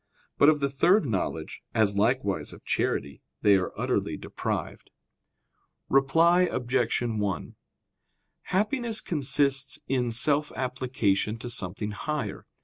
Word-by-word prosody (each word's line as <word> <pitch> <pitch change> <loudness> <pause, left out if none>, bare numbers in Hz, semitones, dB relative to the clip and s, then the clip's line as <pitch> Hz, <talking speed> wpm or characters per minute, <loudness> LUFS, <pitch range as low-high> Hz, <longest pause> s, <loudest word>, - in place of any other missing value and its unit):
But 145 - +7
of 150 -2 +2
the 140 - +1
third 175 +7 +4
knowledge, 105 -8 -3
as 105 -3 +3
likewise 105 -1 0
of - - -15
charity, 70 0 -1 0.2
they 105 -1 +6
are 90 - -2
utterly - - -1
deprived. - - -5 1.0
Reply 165 +7 +4
Obj. 120 -2 0
1: 105 -5 -2 0.9
Happiness 220 +3 0
consists 140 -3 +1
in 125 -2 0
self 145 +6 +2
application 125 -5 -1
to 120 +2 -6
something 105 +1 -4
higher. 105 -3 -4
130 Hz, 115 wpm, -27 LUFS, 105-150 Hz, 1.0 s, But